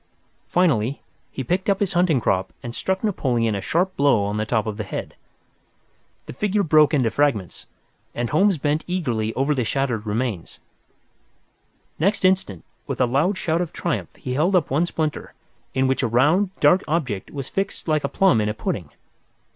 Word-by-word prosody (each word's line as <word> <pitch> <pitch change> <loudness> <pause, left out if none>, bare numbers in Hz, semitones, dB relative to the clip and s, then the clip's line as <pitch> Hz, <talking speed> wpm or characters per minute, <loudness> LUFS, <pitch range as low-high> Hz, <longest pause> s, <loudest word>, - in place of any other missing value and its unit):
Finally, 140 -8 +1 0.3
he 135 - -5
picked 180 - -1
up 195 - +2
his 200 -3 0
hunting 175 -5 +3
crop 95 -4 0
and 120 - -6
struck 190 - -2
Napoleon 125 - 0
a 100 - -2
sharp 185 - 0
blow 140 -7 +3
on 105 +1 -2
the 110 0 -2
top 110 -2 +1
of 110 -2 -4
the 110 - -3
head. 95 - -6 1.1
The - - -8
figure 205 +7 0
broke 155 -3 +5
into 130 -7 +2
fragments, 120 - -1 0.5
and 120 0 -2
Holmes 190 +4 +3
bent 150 +2 0
eagerly 120 -12 -1
over 135 +3 +1
the 130 -4 0
shattered 120 -3 -1
remains. 105 -5 -3 1.4
Next 195 +4 +1
instant, 185 - +1 0.2
with - - -4
a 130 - +4
loud 145 +11 +1
shout 165 -1 0
of 175 - -3
triumph 170 -4 -3
he 125 - -5
held 165 +8 +2
up 165 -7 +1
one 155 +6 +2
splinter, 155 -3 -3 0.4
in 130 0 +2
which 130 0 +1
a 125 - +1
round, 150 - +3
dark 185 +2 +4
object 135 - -2
was 140 -2 -6
fixed 195 -2 -3
like 155 -2 +1
a 140 - -1
plum 180 - +3
in 105 - 0
a 105 - -3
pudding. 90 -7 -3
140 Hz, 180 wpm, -22 LUFS, 115-175 Hz, 1.4 s, broke